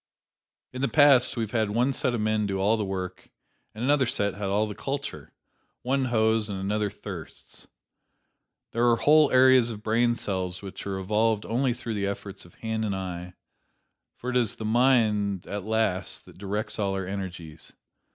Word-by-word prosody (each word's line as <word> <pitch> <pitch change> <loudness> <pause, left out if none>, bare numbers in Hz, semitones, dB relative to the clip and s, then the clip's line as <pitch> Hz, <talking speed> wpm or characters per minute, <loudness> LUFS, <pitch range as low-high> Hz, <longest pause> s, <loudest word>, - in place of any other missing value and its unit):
In 130 - -5
the 135 - +2
past 140 -5 +5
we 115 - 0
have 110 - -5
had 110 -3 +1
one 120 +6 +1
set 125 -1 0
of 110 - -2
men 110 -1 +1
do 95 -1 -2
all 100 +4 +3
the 110 - -2
work, 95 -2 -5 0.5
and 110 - -5
another 140 -1 +3
set 100 -3 0
had 100 0 -4
all 105 +2 +2
the 105 - -5
culture: 140 +6 -5 0.5
one 135 +1 +1
hoes 110 -2 +2
and 95 -1 -4
another 105 +2 -1
thirsts. - - -10 1.0
There 120 +1 +2
are 120 - +5
whole 150 +4 +5
areas 130 -2 +5
of 105 -2 -7
brain 120 +2 +2
cells 95 -3 -3
which 100 0 -8
are 95 -1 -2
evolved 105 +2 +1
only 125 +1 0
through 120 -2 -5
the 100 -2 -1
efforts 100 -1 -6
of 85 - -18
hand 110 -1 -3
and 100 -3 -1
eye, 90 -1 -6 0.8
for 125 - -5
it 125 - +1
is 120 -4 +1
the 110 - -6
mind 110 -5 +2
at 100 -1 -5
last 110 -4 -1
that - - -16
directs 105 +3 -3
all 100 -2 0
our 95 -1 -3
energies. 90 -5 -7
110 Hz, 185 wpm, -26 LUFS, 100-120 Hz, 1.0 s, past